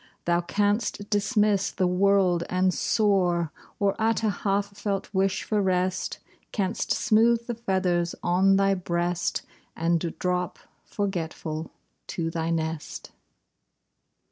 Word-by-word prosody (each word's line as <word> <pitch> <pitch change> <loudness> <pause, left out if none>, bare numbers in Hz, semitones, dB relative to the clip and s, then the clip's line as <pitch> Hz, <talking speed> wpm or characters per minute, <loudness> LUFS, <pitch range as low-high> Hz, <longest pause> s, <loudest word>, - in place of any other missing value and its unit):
Thou 175 0 +2
canst 205 +3 0
dismiss 210 -1 +2
the 185 - 0
world 180 -1 +3
and 185 0 +2
soar, 180 -7 +2 0.3
Or, 200 -1 +2
at 225 +1 +1
a 215 - +3
half 200 +1 -1
felt 200 0 -3
wish 190 0 +1
for 210 -1 0
rest. 185 -1 0 0.3
Canst 200 0 -1
smooth 230 +1 +3
the 240 - -3
feathers 185 -6 0
on 190 +2 +4
thy 195 0 +3
breast, 175 -1 -1 0.3
And 165 0 0
drop, 180 -1 -1 0.3
forgetful, 165 -5 -3 0.4
to 165 -1 -3
thy 165 0 -2
nest. 160 -2 -3
190 Hz, 115 wpm, -26 LUFS, 175-205 Hz, 0.4 s, on